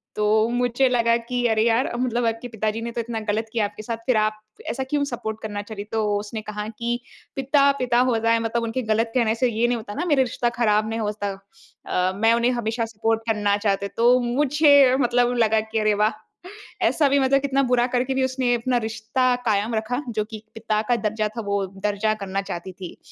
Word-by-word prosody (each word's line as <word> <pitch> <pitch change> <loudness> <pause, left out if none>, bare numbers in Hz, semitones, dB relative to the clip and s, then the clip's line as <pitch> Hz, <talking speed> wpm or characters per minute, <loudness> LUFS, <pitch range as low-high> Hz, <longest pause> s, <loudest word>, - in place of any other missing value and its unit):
तो 210 - 0 0.2
मुझे 245 +2 +1
लगा 235 -2 +3
कि 245 +1 -3
अरे 220 -1 +2
यार 235 +2 +2
मतलब 245 -1 0
आपके 225 +2 -3
पिताजी 220 0 -2
ने 235 +1 -4
तो 235 - -2
इतना 230 -1 -4
गलत 220 +2 -1
किया 225 -3 +1
आपके 205 +1 -7
साथ 230 +1 -4
फिर 250 -3 +3
आप 215 0 +1 0.3
ऐसा 265 - -3
क्यों 290 -1 +1
सपोर्ट 220 -4 -5
करना 205 -1 -4
चली? 205 -1 -7
तो 220 +1 -2 0.2
उसने 215 +1 -6
कहा 210 0 -5
कि 240 +1 -1 0.4
पिता, 275 +1 +3
पिता 245 -2 +2
होता 230 -1 +1
है 230 - +3
मतलब 230 +1 -1
उनके 230 +3 -2
गलत 225 +1 0
कहने 230 -3 +2
से 250 +1 +1
ये 225 +2 +1
नहीं 245 0 0
होता 215 -2 -8
ना, 345 - -2
मेरा 295 -6 +3
रिश्ता 240 -1 -1
ख़राब 215 -2 +2
नहीं 225 +1 -3
होता। 210 -1 -2 0.6
अ, 180 +1 +1
मैं 225 +3 +3
उन्हें 235 +1 +2
हमेशा 230 -1 -1
सपोर्ट 225 0 -1
करना 205 -2 +1
चाहते। 200 -1 0
तो 240 +2 +5
मुझे 280 +1 +4
मतलब 245 0 +2
लगा 220 -1 +3
कि 220 - 0
अरे 215 0 +2
वाह! 210 +1 +2 0.8
ऐसा 295 - +2
भी 280 +1 +3
मतलब 275 +1 +3
कितना 275 0 +1
बुरा 245 -1 +2
करके 255 +1 0
भी 265 - +1
उसने 260 -1 0
अपना 245 +1 0
रिश्ता 235 +3 0
कायम 215 +1 +1
रखा। 230 +4 -2
जो 215 -2 -1
कि 215 -1 -7
पिता 215 -1 -1
का 245 - +4
दर्जा 215 -1 -1
था - - -1
वो 200 -1 0 0.2
दर्जा 210 +1 +1
करना 195 -2 -3
चाहती 180 0 -6
थी। 180 -1 -9
230 Hz, 215 wpm, -23 LUFS, 215-245 Hz, 0.8 s, तो